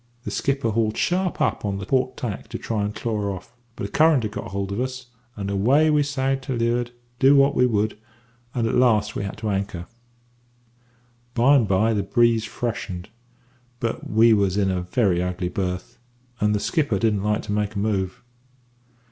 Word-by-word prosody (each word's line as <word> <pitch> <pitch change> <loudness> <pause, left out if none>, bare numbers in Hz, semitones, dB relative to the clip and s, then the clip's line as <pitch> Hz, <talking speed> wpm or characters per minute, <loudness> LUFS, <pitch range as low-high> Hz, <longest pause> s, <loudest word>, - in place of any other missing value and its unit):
"The - - -5
skipper 135 -4 0
hauled 110 0 0
sharp 180 0 0
up - - 0
on 100 -2 -1
the 100 - -5
port 130 +2 0
tack 110 -6 -5
to - - -5
try 110 -3 -2
and 105 +1 -3
claw 105 -3 -2
off; 115 +7 -13 0.2
but - - -4
a - - -18
current 155 -3 +4
had 105 - -2
got - - -6
hold 100 0 -3
of 100 - -3
us, 130 -1 -5 0.2
and 100 -2 -4
away 130 +11 +3
we 150 -1 +4
sagged 135 -2 -1
to 130 - -2
leeward, 120 +1 0 0.3
do 135 +2 +6
what 140 0 +5
we 125 -2 +3
would, 105 -2 0 0.6
and 120 -2 +1
at - - -1
last 110 -4 +3
we - - -2
had 100 +1 -5
to 110 -1 -3
anchor. 95 -3 -3 1.5
"By 125 +5 +5
and 120 -6 +3
by 100 +4 +2
the 105 - +1
breeze 115 0 +2
freshened; 100 -6 -4 0.7
but 115 -3 -3
we 110 +2 +5
was 100 -2 +2
in 100 -2 +2
a 90 -1 -1
very 90 -1 +1
ugly 90 0 -2
berth, 95 +6 -4 0.4
and 105 0 +2
the - - 0
skipper 145 - 0
didn't 105 0 +1
like 105 0 0
to - - -5
make 105 0 -1
a - - -3
move. 100 -2 -1
110 Hz, 195 wpm, -23 LUFS, 100-125 Hz, 1.5 s, do